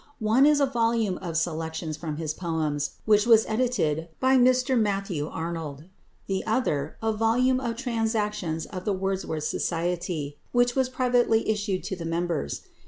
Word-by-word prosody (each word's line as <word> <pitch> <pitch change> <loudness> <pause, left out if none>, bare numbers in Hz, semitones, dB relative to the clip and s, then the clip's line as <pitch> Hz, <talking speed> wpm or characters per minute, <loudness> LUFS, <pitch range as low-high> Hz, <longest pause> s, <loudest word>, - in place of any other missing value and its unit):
One 230 +5 +4
is 300 -1 +4
a 280 - +4
volume 230 -6 0
of 170 -3 -3
selections 160 -1 -2
from 155 -1 -5
his 155 -1 -2
poems, 155 -5 -2
which 210 0 +4
was 225 -2 +6
edited 200 -10 0
by 260 +1 +4
Mr 255 +1 +4
Matthew 195 -8 0
Arnold, 160 -4 -5 0.4
the 190 -1 -2
other, 155 - 0
a 220 0 +1
volume 245 +4 +2
of 235 -3 -3
Transactions 215 - -1
of 185 -2 -7
the 205 - 0
Wordsworth 190 -5 -2
Society, 165 -3 -2 0.2
which 245 0 +3
was 260 -1 +2
privately 245 -3 +2
issued 205 -3 -1
to 190 - -3
the 170 -2 -7
members. 165 - -2
195 Hz, 155 wpm, -26 LUFS, 165-235 Hz, 0.4 s, was